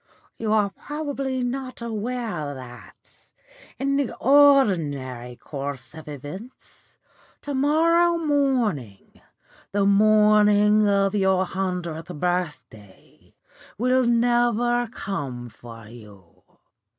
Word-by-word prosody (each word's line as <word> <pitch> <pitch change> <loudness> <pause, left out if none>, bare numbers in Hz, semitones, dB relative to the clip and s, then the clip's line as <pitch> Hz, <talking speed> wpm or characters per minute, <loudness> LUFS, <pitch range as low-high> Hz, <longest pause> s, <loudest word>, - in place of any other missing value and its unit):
You 220 -2 -2
are 210 -2 +2
probably 275 0 -4
not 255 +1 -4
aware 220 - -4
that, 125 -2 -14 0.5
in 275 +1 0
the 280 -4 -2
ordinary 165 - +3
course 140 0 -7
of 160 -1 -11
events, 150 - -11 0.5
to 290 - -4
morrow 335 +5 +3
morning 255 - -1 0.5
the 200 -1 +2
morning 210 0 +4
of 200 0 +2
your 190 -2 +2
hundredth 180 -3 -4
birthday 150 - -5 0.4
will 255 +2 +2
never 240 0 +2
come 135 - -5
for 115 0 -13
you. 105 -6 -16
205 Hz, 90 wpm, -23 LUFS, -, 0.5 s, morning